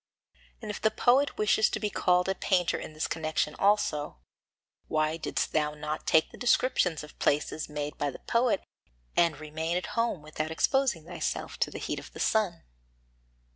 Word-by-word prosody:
And 215 Hz, -, -3 dB
if 205 Hz, -, -7 dB
the 220 Hz, -, +4 dB
poet 260 Hz, +6 st, +3 dB
wishes 215 Hz, +1 st, +3 dB
to -, -, -2 dB
be 210 Hz, -1 st, -2 dB
called 180 Hz, 0 st, +2 dB
a 190 Hz, -, +2 dB
painter 180 Hz, -3 st, +1 dB
in -, -, -8 dB
this 155 Hz, -, -2 dB
connection 155 Hz, -2 st, -1 dB
also, 195 Hz, -, +1 dB, 0.7 s
why 155 Hz, 0 st, +1 dB
didst 165 Hz, -, -2 dB
thou 150 Hz, -1 st, 0 dB
not 150 Hz, +1 st, -5 dB
take 160 Hz, -, +4 dB
the -, -, -13 dB
descriptions 190 Hz, -, +2 dB
of 150 Hz, -, -13 dB
places 150 Hz, +2 st, 0 dB
made 150 Hz, 0 st, -4 dB
by 145 Hz, -, +1 dB
the -, -, -8 dB
poet 235 Hz, -3 st, +2 dB, 0.5 s
and 165 Hz, -4 st, +3 dB
remain 160 Hz, +3 st, -2 dB
at 180 Hz, -, -3 dB
home 230 Hz, -9 st, 0 dB
without 155 Hz, 0 st, -4 dB
exposing 215 Hz, -, +1 dB
thyself -, -, -4 dB
to -, -, +2 dB
the -, -, -7 dB
heat -, -, -3 dB
of -, -, -13 dB
the -, -, -9 dB
sun? 200 Hz, -7 st, +1 dB
165 Hz, 175 wpm, -29 LUFS, 155-210 Hz, 0.7 s, the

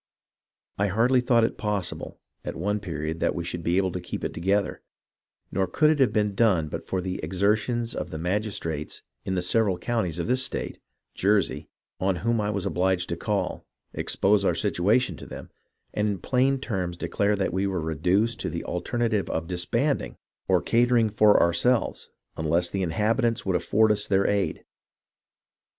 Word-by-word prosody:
I 100 Hz, -, +2 dB
hardly 120 Hz, +6 st, +3 dB
thought 120 Hz, -2 st, +3 dB
it 115 Hz, -, -1 dB
possible, 105 Hz, -4 st, -3 dB, 0.2 s
at -, -, -5 dB
one 105 Hz, +5 st, -1 dB
period, 80 Hz, -4 st, -4 dB
that -, -, 0 dB
we 85 Hz, -, -3 dB
should 85 Hz, 0 st, -4 dB
be 85 Hz, +2 st, +1 dB
able 95 Hz, -1 st, +2 dB
to 90 Hz, -, -4 dB
keep 90 Hz, -, -6 dB
it -, -, -2 dB
together, 95 Hz, +4 st, 0 dB, 0.7 s
nor 95 Hz, 0 st, 0 dB
could 150 Hz, -, +3 dB
it 155 Hz, -, 0 dB
have 130 Hz, -, +4 dB
been 105 Hz, -2 st, +1 dB
done 95 Hz, -8 st, +2 dB
but -, -, -6 dB
for 95 Hz, -, -1 dB
the 90 Hz, 0 st, -4 dB
exertions 110 Hz, +5 st, 0 dB
of -, -, -4 dB
the 80 Hz, -, -5 dB
magis 100 Hz, +5 st, -1 dB
trates 75 Hz, -2 st, -5 dB, 0.2 s
in 95 Hz, -, -1 dB
the 90 Hz, -, 0 dB
several 100 Hz, 0 st, +2 dB
counties 100 Hz, -9 st, -1 dB
of 85 Hz, -, -2 dB
this 130 Hz, +1 st, +2 dB
state -, -, -3 dB, 0.3 s
(Jersey), 100 Hz, 0 st, +1 dB, 0.3 s
on 95 Hz, 0 st, +1 dB
whom 115 Hz, -1 st, +2 dB
I 105 Hz, -, -1 dB
was 100 Hz, -2 st, -2 dB
obliged 95 Hz, -1 st, 0 dB
to 85 Hz, -, -1 dB
call, 105 Hz, +3 st, -2 dB, 0.3 s
expose 100 Hz, +1 st, +2 dB
our -, -, +2 dB
situation 110 Hz, +9 st, +1 dB
to -, -, -10 dB
them, -, -, -9 dB, 0.4 s
and 105 Hz, 0 st, 0 dB
in 100 Hz, -, -1 dB
plain 130 Hz, +7 st, +1 dB
terms 90 Hz, -9 st, -3 dB
declare 100 Hz, +3 st, 0 dB
that 95 Hz, -1 st, -1 dB
we 95 Hz, +2 st, 0 dB
were 95 Hz, -2 st, -1 dB
reduced 90 Hz, +9 st, +1 dB
to -, -, -2 dB
the 85 Hz, +1 st, -4 dB
alternative 110 Hz, +3 st, -1 dB
of 80 Hz, -, -2 dB
disbanding 95 Hz, -, -1 dB, 0.3 s
or -, -, +3 dB
catering 120 Hz, -2 st, +3 dB
for 105 Hz, 0 st, +5 dB
ourselves 100 Hz, +9 st, +1 dB, 0.3 s
unless 85 Hz, +3 st, +1 dB
the 100 Hz, -, -1 dB
inhab 105 Hz, +6 st, +1 dB
itants 120 Hz, -1 st, +1 dB
would 95 Hz, -2 st, +1 dB
afford 105 Hz, +5 st, +3 dB
us 105 Hz, -1 st, 0 dB
their 100 Hz, 0 st, +2 dB
aid. 100 Hz, -1 st, 0 dB
100 Hz, 180 wpm, -26 LUFS, 90-115 Hz, 0.7 s, for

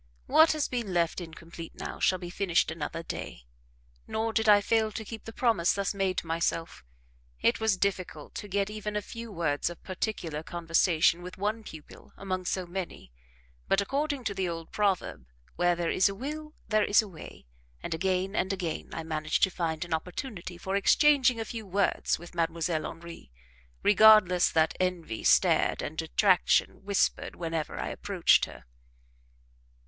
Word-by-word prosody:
"What 320 Hz, 0 st, +5 dB
has 305 Hz, -2 st, -1 dB
been 230 Hz, -7 st, -3 dB
left 170 Hz, +1 st, +1 dB
incomplete 165 Hz, 0 st, -10 dB
now, -, -, -6 dB
shall 185 Hz, -, +3 dB
be 175 Hz, -1 st, -8 dB
finished 180 Hz, -4 st, +1 dB
another 165 Hz, +1 st, -5 dB
day." -, -, -7 dB, 0.6 s
Nor 220 Hz, +1 st, -2 dB
did 220 Hz, -1 st, +2 dB
I 205 Hz, -1 st, +8 dB
fail 220 Hz, +1 st, +1 dB
to 220 Hz, +1 st, -6 dB
keep 225 Hz, 0 st, -8 dB
the 225 Hz, -, -7 dB
promise 225 Hz, -8 st, +2 dB
thus 200 Hz, 0 st, -1 dB
made 195 Hz, -2 st, -1 dB
to -, -, -2 dB
myself. 165 Hz, -, -2 dB, 0.6 s
It -, -, +2 dB
was 220 Hz, -3 st, +2 dB
difficult 185 Hz, -6 st, -3 dB
to 205 Hz, -, -6 dB
get 200 Hz, +1 st, -1 dB
even 210 Hz, 0 st, -5 dB
a 210 Hz, -, -1 dB
few 230 Hz, +1 st, -8 dB
words 160 Hz, -6 st, -1 dB
of 175 Hz, -, -11 dB
particular 180 Hz, -5 st, -3 dB
conversation 170 Hz, 0 st, +2 dB
with 180 Hz, +1 st, -9 dB
one 210 Hz, +3 st, -2 dB
pupil 155 Hz, -7 st, -12 dB
among 185 Hz, -2 st, -3 dB
so 185 Hz, +1 st, -1 dB
many; 175 Hz, -, -6 dB, 0.6 s
but, 195 Hz, -, +3 dB
according 280 Hz, +6 st, -1 dB
to 205 Hz, -, -2 dB
the 190 Hz, -2 st, -1 dB
old 165 Hz, -1 st, -6 dB
proverb, 190 Hz, -, -1 dB, 0.3 s
"Where 175 Hz, 0 st, +2 dB
there 170 Hz, -1 st, -1 dB
is 190 Hz, -, +3 dB
a 200 Hz, -, -5 dB
will, 305 Hz, +6 st, -6 dB
there 215 Hz, -1 st, +2 dB
is 205 Hz, +2 st, +4 dB
a -, -, -8 dB
way;" 170 Hz, -, -12 dB, 0.4 s
and 170 Hz, -, -3 dB
again 190 Hz, +3 st, -1 dB
and 190 Hz, -, 0 dB
again 175 Hz, -5 st, -4 dB
I 165 Hz, -, -4 dB
managed 155 Hz, -1 st, -1 dB
to 190 Hz, -, +5 dB
find 165 Hz, -2 st, -2 dB
an 170 Hz, -, -4 dB
opportunity 180 Hz, -, -5 dB
for 190 Hz, +2 st, -3 dB
exchanging 260 Hz, +3 st, +4 dB
a 225 Hz, -, -2 dB
few 220 Hz, -2 st, -7 dB
words 195 Hz, +1 st, +1 dB
with 175 Hz, +1 st, -12 dB
Mdlle. 165 Hz, -1 st, -1 dB
Henri, 165 Hz, -, -11 dB, 0.5 s
regardless 205 Hz, -4 st, +6 dB
that 160 Hz, 0 st, +2 dB
envy 180 Hz, -11 st, -2 dB
stared -, -, +3 dB
and 155 Hz, -, -5 dB
detraction 185 Hz, +4 st, +2 dB
whispered 200 Hz, 0 st, 0 dB
whenever 165 Hz, -2 st, -3 dB
I -, -, -3 dB
approached -, -, +2 dB
her. 65 Hz, -1 st, -13 dB
185 Hz, 170 wpm, -29 LUFS, 165-210 Hz, 0.6 s, I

